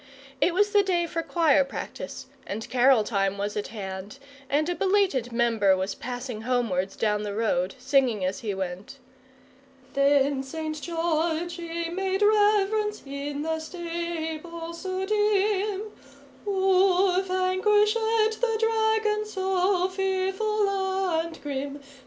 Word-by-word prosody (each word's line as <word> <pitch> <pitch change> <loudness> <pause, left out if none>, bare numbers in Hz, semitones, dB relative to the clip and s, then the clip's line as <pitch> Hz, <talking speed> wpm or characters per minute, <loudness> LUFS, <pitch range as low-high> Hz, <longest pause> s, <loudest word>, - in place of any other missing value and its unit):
It 345 +3 +3
was 410 +2 +3
the 410 -1 +5
day 360 -3 +1
for 330 0 -3
choir 315 -4 +3
practice, 270 - -7 0.2
and 220 +2 -5
carol 255 -2 +5
time 200 -2 0
was 205 +1 -3
at 210 - -2
hand, 195 +1 -7 0.3
and 300 +3 +1
a 355 - 0
belated 375 - +1
member 225 -5 +3
was 190 +2 -2
passing 245 -2 -6
homewards 220 -6 -1
down 210 -1 0
the 205 -1 -4
road, 195 -3 0
singing 255 -6 +2
as 190 +1 -2
he 210 -4 -3
went: 190 +7 -5 1.0
"Then 275 0 +3
St. 310 +3 -5
George: 335 0 -1
ee 335 0 -4
made 385 +3 -1
rev'rence: 420 0 +2
in 280 +1 -4
the 320 0 -1
stable 335 0 -5
so 375 +2 -3
dim, 415 -1 +1 0.6
Oo 380 -1 +3
vanquished 380 +3 +2
the 445 0 +1
dragon: 440 -1 +1
so 380 -2 +1
fearful 385 +2 0
and 380 -4 -1
grim. 280 0 -4
335 Hz, 125 wpm, -26 LUFS, 260-385 Hz, 1.0 s, the